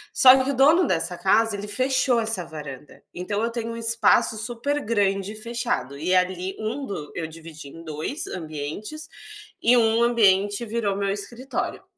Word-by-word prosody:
só 260 0 +7
que 270 - -1
o - - -3
dono 310 +7 +5
dessa 170 0 -1
casa 210 +4 +2
ele 205 - -6
fechou 255 +2 +1
essa 220 -6 -2
varanda, 150 -3 -10
então 205 +4 -3
eu 230 - +1
tenho 230 -1 -4
um - - -7
espaço 230 -1 +2
supergrande 220 -4 -1
fechado 215 - -3
e 170 +6 -1
ali 185 +1 0
um 230 +6 -3
do 150 - -6
eu 165 - -3
dividi 160 -2 -11
em 165 +4 -12
2 160 - -5
ambientes 170 - -6 0.5
e 240 +2 +5
1 225 0 +3
ambiente 205 -2 +3
virou 215 -3 -1
meu 200 0 -1
escritório 235 +6 -5
210 Hz, 160 wpm, -24 LUFS, 180-235 Hz, 0.5 s, só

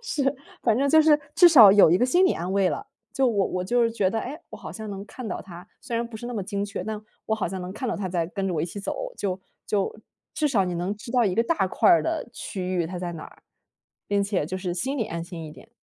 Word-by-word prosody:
是， 285 - 0 0.3
反 225 -2 +3
正 280 +2 +2
就 315 +3 +6
是 305 -1 +5 0.2
至 350 0 +8
少 230 - +9
有 195 -5 +7
一 - - +5
个 245 - +2
心 350 +9 +4
理 - - +3
安 180 +2 -4
慰 195 -1 +3
了， 410 - -3 0.3
就 270 - +1
我 200 -4 +1
我 180 0 -3
就 240 +3 +2
觉 210 -5 0
得， 225 - -1
哎， 265 +6 -5
我 - - -8
好 - - -9
像 220 -2 -7
能 195 0 -6
看 250 -3 -8
到 185 - -4
它， 180 -1 -11
虽 240 -3 -4
然 235 - 0
不 230 - -9
是 240 +2 -7
那 245 - -5
么 205 - -2
精 200 +1 -3
确， 205 - -5
但 215 -1 -4 0.3
我 220 - +1
好 215 - -1
像 185 +1 -5
能 180 - -6
看 255 +5 -4
到 - - -1
它 195 -2 -3
在 170 -2 -1
跟 195 +2 -3
着 - - -1
我 155 - 0
一 - - 0
起 200 +4 -7
走， - - -4
就 190 -2 -3 0.2
就 200 -1 -1 0.4
至 300 -1 +1
少 210 -8 +2
你 180 -1 -3
能 175 +4 -2
知 230 +3 -9
道 245 -2 +4
一 190 -3 0
个 230 - +4
大 275 - +1
块 345 - +4
的 325 -4 -2
区 190 -6 -5
域 175 -2 +1
它 180 +2 -5
在 175 -1 -4
哪 160 - -8
儿， - - -16 0.7
并 200 0 +2
且 195 -6 -1
就 185 +5 -4
是 180 -2 -3
心 265 +10 -2
里 225 - +1
安 170 -4 -4
心 170 -1 -8
一 155 - -9
点。 195 - -15
205 Hz, 305 characters per minute, -25 LUFS, 185-245 Hz, 0.7 s, 少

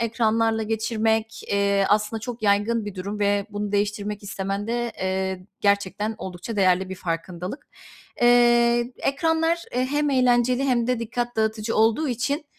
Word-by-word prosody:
ekranlarla 225 -1 +1
geçirmek, 220 0 -1
eee, 200 -1 +2
aslında 215 +1 +1
çok 235 -1 -6
yaygın 210 +2 +2
bir 205 - -6
durum 200 +3 -5
ve 205 0 +1
bunu 205 0 -4
değiştirmek 205 0 -1
istemen 195 0 -4
de, 240 0 -2
eee, 190 0 -2
gerçekten 200 +2 0
oldukça 190 +4 -6
değerli 185 -1 +3
bir 190 - -5
farkındalık. 180 - -5 0.6
Eee, 240 0 +4
ekranlar, 325 +3 +1
e, 250 +1 0
hem 290 +1 0
eğlenceli 250 0 +3
hem 240 -3 +1
de 250 -1 0
dikkat 240 +1 -3
dağıtıcı 220 0 -1
olduğu 225 +7 +3
için, 255 +6 -1
220 Hz, 145 wpm, -24 LUFS, 200-240 Hz, 0.6 s, Eee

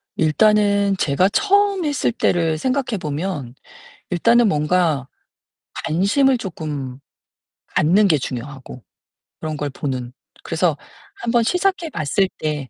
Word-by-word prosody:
일단은 200 +4 +3
제가 180 +4 +2
처음 400 - +2
했을 290 -5 0
때를 165 -8 +1
생각해 255 - -1
보면 150 -5 -4 0.6
일단은 230 +6 +4
뭔가 150 -4 +1 0.8
관심을 205 - +2
조끔 150 - -5 0.7
갖는 195 +7 +3
게 160 -5 +3
중요하고 130 -1 -7 0.6
그런 155 -1 -4
걸 145 0 -3
보는. 130 -3 -4 0.3
그래서 165 -2 0 0.4
1 235 - -1
번 235 -1 +3
시작해 360 - 0
봤을 185 - 0
때 150 -4 -3
175 Hz, 225 characters per minute, -20 LUFS, 150-230 Hz, 0.8 s, 일단은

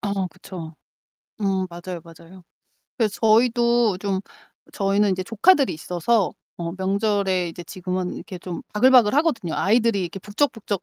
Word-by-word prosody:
어 200 -2 -1
그쵸. 175 -3 -9 0.7
어 - - -2 0.3
맞아요, 175 0 -7
맞아요. 170 +2 -15 0.5
그래서 215 -4 0
저희도 235 -2 +3
좀 195 -1 -1 0.5
저희는 200 +1 +2
인제 185 0 -1
조카들이 270 - +3
있어서 180 +6 0 0.2
어 170 -1 -4
명절에 195 -2 0
이제 175 +1 -9
지금은 185 +1 -4
이렇게 185 - -8
좀 175 -1 -6
바글바글 245 0 +5
하거든요. 285 - +1
아이들이 225 0 +2
이렇게 175 +2 -5
북적북적 210 -2 -2
195 Hz, 340 characters per minute, -23 LUFS, 180-225 Hz, 0.7 s, 바글바글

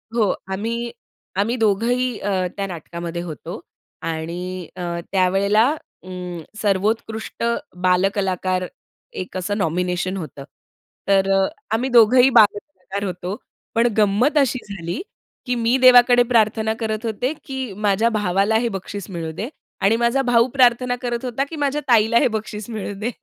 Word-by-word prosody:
हो. 215 -5 +3 0.2
आम्ही 230 +4 -3 0.5
आम्ही 225 +5 +1
दोघंही 235 +3 +1
अ, 205 - -2 0.3
त्या 200 - -1
नाटकामध्ये 170 0 -6
होतो 165 -4 -7 0.4
आणि 170 +2 -4
अ, 185 - -7 0.3
त्यावेळेला 200 +4 +3 0.4
अ, 185 - -11 0.5
सर्वोत्कृष्ट 220 +3 -1 0.4
बालकलाकार, 185 0 +1 0.5
एक 185 0 -5
असं 205 +3 -2
नॉमिनेशन 180 +1 -1
होतं. 145 -5 -7 0.6
तर 195 0 +3
अ, 195 0 +4 0.3
आम्ही 245 +4 0
दोघंही 245 +2 +6
बालकलाकार 200 -4 +2
होतो. 180 +1 -4 0.4
पण 230 +1 +4
गंमत 215 +9 +3
अशी 265 -2 +2
झाली, 175 -2 -4 0.4
की 250 -1 0
मी 235 +2 +2
देवाकडे 245 -1 +7
प्रार्थना 220 -1 +2
करत 220 0 -2
होते, 245 +6 -1
की 265 -6 -5
माझ्या 210 +2 +2
भावाला 205 0 +1
हे 235 - 0
बक्षीस 200 0 -6
मिळू 165 -3 -4
दे 215 - -5 0.3
आणि 200 +3 +4
माझा 235 +3 +2
भाऊ 245 -2 +3
प्रार्थना 250 -1 +3
करत 240 0 -3
होता, 250 +2 -1
की 325 - -6
माझ्या 290 0 -1
ताईला 230 -1 +4
हे 275 - +4
बक्षीस 215 -1 -5
मिळू 215 -3 -4
दे. 235 +3 -2
210 Hz, 140 wpm, -21 LUFS, 185-235 Hz, 0.6 s, देवाकडे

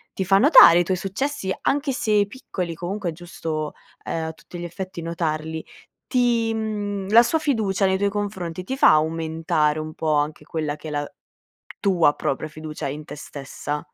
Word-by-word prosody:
ti 190 - -1
fa 195 +1 +4
notare 200 - +8
i - - +3
tuoi 185 - +1
successi, 195 +2 -2
anche 285 0 +1
se 210 -5 +2
piccoli 185 -6 -5
comunque 180 +2 -3
è - - -2
giusto, 160 -3 -5 0.3
ehm, 160 -1 -2
a - - -3
tutti 175 +2 -12
gli - - -5
effetti 180 0 -6
notarli. 160 -1 -2 0.5
Ti, 235 -3 +2 0.6
la 230 +2 +8
sua 320 +7 +1
fiducia, 215 -10 +1
nei 190 0 +2
tuoi 200 +1 +1
confronti, 190 -4 -4
ti 265 +7 -4
fa - - +7
aumentare 160 0 +1
un 155 0 -5
po' 155 -2 -1
anche 150 +1 -1
quella 150 -2 -3
che 155 - -10
è - - -5
la 145 0 -3 0.7
tua 175 -8 +3
propria 155 +3 -2
fiducia 155 -1 -6
in 150 +2 -6
te 150 - -8
stessa? 145 +1 -6
170 Hz, 175 wpm, -23 LUFS, 155-200 Hz, 0.7 s, notare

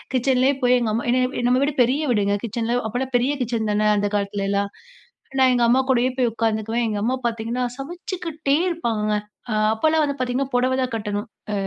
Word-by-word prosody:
கிச்சன்லே 260 +1 +3
போய், 250 0 +5
எங்க 230 -3 -1
அம்மா 230 - -1
என்ன 255 +1 +3
இப்பிடி 245 -2 -3
நம்ம 255 +1 +3
வீடு 290 0 -1
பெரிய 260 +5 0
வீடுங்க 205 -3 +1
கிச்சன்ல 235 +2 -1
அப்பல்லாம் 250 +3 -3
பெரிய 255 +4 +1
கிச்சன் 225 -2 -2
தான! 210 0 +2
அந்த 205 0 +1
காலத்துலலாம். 200 0 -1 0.7
நான் 260 -1 +5
எங்க 240 -1 +2
அம்மா 250 +2 +4
கூடயே 255 0 +3
போய் 245 -2 +2
உட்காந்துக்குவேன். 225 +1 0
எங்க 215 -2 -2
அம்மா 250 +3 +1
பார்த்தீங்கன்னா, 235 +2 -2
சமைச்சுக்கிட்டே 320 -1 -3
இருப்பாங்கங்க. 225 -11 -1 0.4
அ - - 0 0.2
அப்பல்லாம் 315 +8 +2
வந்து 280 -1 -1
பார்த்தீங்கன்னா 255 +2 -1
புடவ 255 +1 +2
தான் 255 - -1
கட்டணும். 205 -1 -3 0.2
அ - - -2
240 Hz, 185 wpm, -22 LUFS, 220-260 Hz, 0.7 s, போய்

